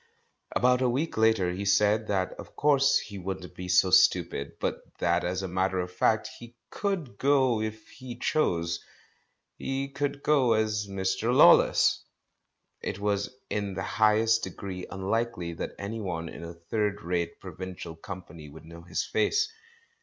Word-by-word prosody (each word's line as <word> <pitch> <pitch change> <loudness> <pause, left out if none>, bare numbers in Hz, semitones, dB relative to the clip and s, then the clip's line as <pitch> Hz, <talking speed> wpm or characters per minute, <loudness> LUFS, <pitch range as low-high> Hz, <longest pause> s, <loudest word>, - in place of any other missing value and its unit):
About 125 +1 +3
a 130 - +3
week 140 +7 -1
later 110 -5 +3
he 95 +3 -4
said 105 +2 +3
that 95 -2 0
of - - -11
course 140 -1 +4
he 100 -2 -6
wouldn't 95 -1 -6
be 90 - -7
so 90 +1 +4
stupid, 70 -5 +3
but - - -2 0.2
that 85 0 +1
as 90 +2 -2
a - - -2
matter 95 +1 0
of 90 0 -3
fact 110 +4 +1
he 120 0 -12 0.2
could 175 - -3
go 130 -5 +3
if 110 0 -5
he 130 -2 -9
chose; 85 - 0 0.8
he 135 +1 -2
could 140 0 -3
go 135 -6 +4
as 110 -1 0
"Mr. 95 +3 -1
Law 125 - +9
less"! - - +3 0.8
It - - -4
was 100 0 -1 0.2
in 100 -2 -2
the 95 - -3
highest 110 +2 +3
degree 95 -3 -6
unlikely 95 -2 -2
that 80 - -6
anyone 100 -6 -4
in 85 - -9
a 85 0 -8
third 105 +4 -2
rate 85 -1 -2
provincial 90 -3 -8
company 85 -3 -9
would 80 +2 -13
know 85 +1 -11
his 85 - -3
face. 110 - +1
100 Hz, 160 wpm, -28 LUFS, 90-115 Hz, 0.8 s, Law